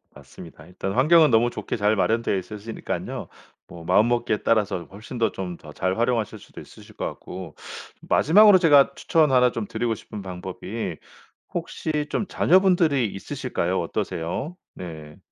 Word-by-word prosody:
맞습니다. 80 -2 -13
일단 95 +3 -5
환경은 155 +5 +5
너무 115 +1 +4
좋게 - - -5
잘 105 0 +2
마련되어 115 +2 +1
있으시니깐요 105 +4 -6 0.4
뭐 85 -1 -11
마음먹기에 110 +5 +2
따라서 105 -6 +1
훨씬 110 +6 -9
더 115 -3 +1
좀 90 -3 -6
더 75 -1 -13
잘 95 +5 -1
활용하실 115 -2 0
수도 - - -12
있으실 - - -15
것 - - -4
같고, 90 -3 -8 0.5
마지막으로 205 +5 +6
제가 145 -5 +5
추천 160 -4 +2
1 125 -1 +4
좀 115 -4 -4
드리고 120 -2 -1
싶은 105 0 -9
방법이 95 +3 -6 0.6
혹시 150 -2 -3
좀 210 - -1
자녀분들이 175 - +3
있으실까요? 100 -5 -3
어떠세요? 85 - -4 0.2
네. 80 -4 -9
110 Hz, 340 characters per minute, -24 LUFS, 95-135 Hz, 0.6 s, 마지막으로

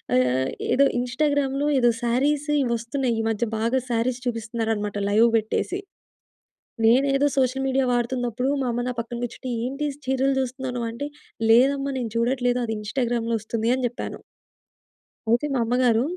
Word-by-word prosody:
ఆహ్, 125 +1 +2 0.3
ఏదో 280 +1 +5
ఇంస్టాగ్రామ్‌లో 275 +2 0
ఏదో 240 -1 +4
సారీస్ 280 +5 +1 0.2
ఇవొస్తున్నాయి. 235 +1 -1
ఈ - - +1
మధ్య 225 +2 0
బాగా 235 +4 +1
సారీస్ 240 +2 0
చూపిస్తున్నారనమాట 225 -3 -2
లైవ్ 220 +3 +5
బెట్టేసి. 225 - -1 1.1
నేనేదో 275 +4 +4
సోషల్ 265 +1 +1
మీడియా 265 0 +2
వాడుతున్నప్పుడు 245 +1 -1
మా 255 - -1
అమ్మ 240 +1 -2
నా - - -2
పక్కన 235 +1 -7
గూర్చుంటే, 255 +2 -7 0.2
ఏంటి 275 +3 -2 0.2
చీరలు 265 +1 +2
చూస్తున్నావు 260 0 -4
నువ్వు 235 -1 -2
అంటే, 285 +5 -4 0.4
"లేదమ్మా 275 +3 +4
నేను 230 -3 -3
చూడట్లేదు 245 +1 +1
అది 225 - -2
ఇంస్టాగ్రామ్‌లో 235 0 -1
ఒస్తుంది" 225 +1 -2
అని 260 - -3
జెప్పాను. 245 - -6 1.1
అయితే 240 +5 +3
మా 260 - +1
అమ్మగారు, 245 -1 +3
245 Hz, 140 wpm, -24 LUFS, 230-265 Hz, 1.1 s, ఏదో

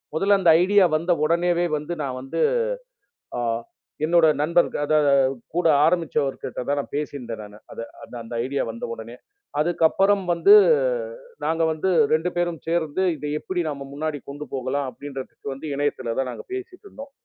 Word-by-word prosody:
முதல்ல 195 +3 +3
அந்த 170 -3 +6
ஐடியா 200 -1 +5
வந்த 170 +3 -1
உடனேயே 175 +1 +2
வந்து 170 +4 -5
நான் 130 -2 -4
வந்து 135 - -3 1.0
அ - - -1 0.6
என்னோட 170 0 +5
நண்பர் 170 +3 +3
க - - -1
த - - +4 0.6
கூட 175 -1 +1 0.2
ஆரம்பிச்சவர்கிட்ட 155 -7 0
தான் 145 0 -1
பேசி 150 0 -2
இருந்தேன் 115 -4 -6
நானு. 105 0 -11
அத - - -7 0.4
அந்த 115 - -8
ஐடியா 140 +2 -1
வந்த 115 - -7
உடனே 115 +2 -10 0.4
அதுக்கப்புறம் 175 +5 +3
வந்து 400 - +6 0.9
நாங்க 165 +1 0
வந்து 160 +4 -1 0.2
2 160 +3 +2
பேரும் 175 -2 0
சேர்ந்து 165 +1 0
இதை 150 - -5
எப்படி 180 +1 -3
நாம 140 -2 -5
முன்னாடி 150 0 -3
கொண்டு 145 +2 -6
போகலாம்? 135 +1 -2
அப்படிங்கறதுக்கு 135 0 -8
வந்து 135 +4 -7
இணையத்துல 130 -5 -1
தான் 135 - 0
நாங்க - - -8
பேசிட்டு 385 +1 -7
இருந்தோம். 280 -7 -10
155 Hz, 155 wpm, -23 LUFS, 140-175 Hz, 1.0 s, அந்த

